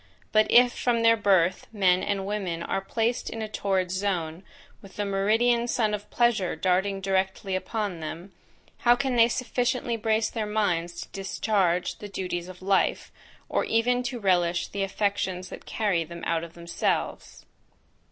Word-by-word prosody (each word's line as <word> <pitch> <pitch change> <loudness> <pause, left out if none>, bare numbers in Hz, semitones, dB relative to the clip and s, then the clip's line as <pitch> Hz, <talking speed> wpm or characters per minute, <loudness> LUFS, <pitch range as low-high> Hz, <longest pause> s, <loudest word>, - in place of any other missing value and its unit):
But, 215 0 +4
if 245 0 +6
from 235 -2 0
their 230 0 +6
birth 190 -4 +2
men 185 -4 +3
and 195 -1 -1
women 190 -5 -3
are 195 - -2
placed 230 +4 -1
in 225 -1 -5
a - - -3
torrid 190 -3 -1
zone, 185 -4 -2 0.4
with 195 -1 -14
the 205 - -2
meridian 225 +5 +2
sun 220 -3 +1
of 210 0 -5
pleasure 235 -7 +1
darting 195 +1 0
directly 190 0 -1
upon 200 -2 -3
them, 165 +4 -7 0.5
how 240 0 +5
can 260 0 -1
they 230 -1 +6
sufficiently 245 -1 -1
brace 220 0 +1
their 220 -2 -3
minds 175 -5 -1
to - - -16
discharge 190 -2 0
the 205 - -8
duties 180 -3 -4
of 185 0 -11
life, 195 0 +1 0.4
or - - 0
even 245 +2 +2
to 245 0 -4
relish 175 -3 +1
the 200 - -4
affections 195 -2 -1
that - - -10
carry 200 -7 0
them 170 +1 -10
out 165 -1 0
of 170 0 -10
themselves? 170 0 -3
200 Hz, 160 wpm, -26 LUFS, 180-225 Hz, 0.5 s, if